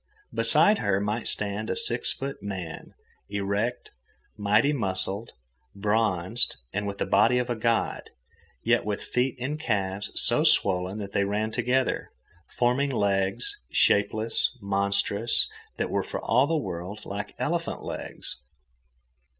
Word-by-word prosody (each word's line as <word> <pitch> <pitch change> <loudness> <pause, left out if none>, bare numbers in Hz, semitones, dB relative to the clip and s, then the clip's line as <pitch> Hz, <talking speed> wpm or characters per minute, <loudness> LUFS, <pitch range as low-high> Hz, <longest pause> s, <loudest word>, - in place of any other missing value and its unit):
Beside 210 +1 +5
her 100 -2 +1
might 105 +3 -2
stand 105 +1 0
a - - 0
six 120 +1 +1
foot 135 +1 -6
man, 95 -5 -7 0.3
erect, 100 +4 -2 0.4
mighty 105 +7 +2
muscled, 100 -2 -2 0.4
bronzed, 105 0 +1 0.2
with 100 0 -3
the - - -1
body 115 +5 +4
of 125 0 -1
a - - 0
god, 115 0 -1 0.5
yet - - +3
with 105 -1 -3
feet 125 +1 -1
and 145 +5 -3
calves 100 -7 -1
so - - +4
swollen 95 +1 +4
that 100 -2 -6
they 100 - +1
ran 105 +2 -1
together, 125 +3 0 0.4
forming 125 +4 +1
legs, 100 - -1
shapeless, 110 +4 +2
monstrous, 100 +2 +1 0.3
that - - -2
were - - +1
for - - -5
all 125 +5 +2
the 165 - 0
world 95 - -5
like 100 +1 -6
elephant - - -2
legs. - - -7
105 Hz, 130 wpm, -26 LUFS, 100-120 Hz, 0.5 s, Beside